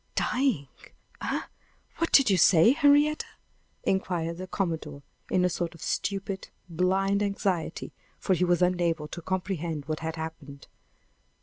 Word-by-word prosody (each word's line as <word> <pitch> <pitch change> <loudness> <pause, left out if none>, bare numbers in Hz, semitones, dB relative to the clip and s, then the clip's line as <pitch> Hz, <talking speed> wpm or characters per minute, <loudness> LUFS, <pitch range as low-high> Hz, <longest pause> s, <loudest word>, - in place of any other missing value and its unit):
"Dying? 250 - +1 0.5
Eh! - - -1 0.6
what 330 - -1
did 270 -6 +6
you - - +5
say, 175 +4 +6
Henrietta?" 290 +1 +3 0.6
inquired 170 -3 -1
the 185 +1 -6
commodore, 160 -7 -3 0.3
in 180 -1 +2
a - - +5
sort 170 -1 -3
of 165 - -15
stupid, 195 -1 -3 0.2
blind 190 +4 +1
anxiety; 195 -4 -2 0.2
for 190 - 0
he 180 0 +1
was 175 0 +3
unable 170 -4 +1
to 175 - -7
comprehend 175 -5 -3
what 155 +1 -3
had 160 0 -4
happened. 160 -3 -8
180 Hz, 135 wpm, -27 LUFS, 160-195 Hz, 0.6 s, did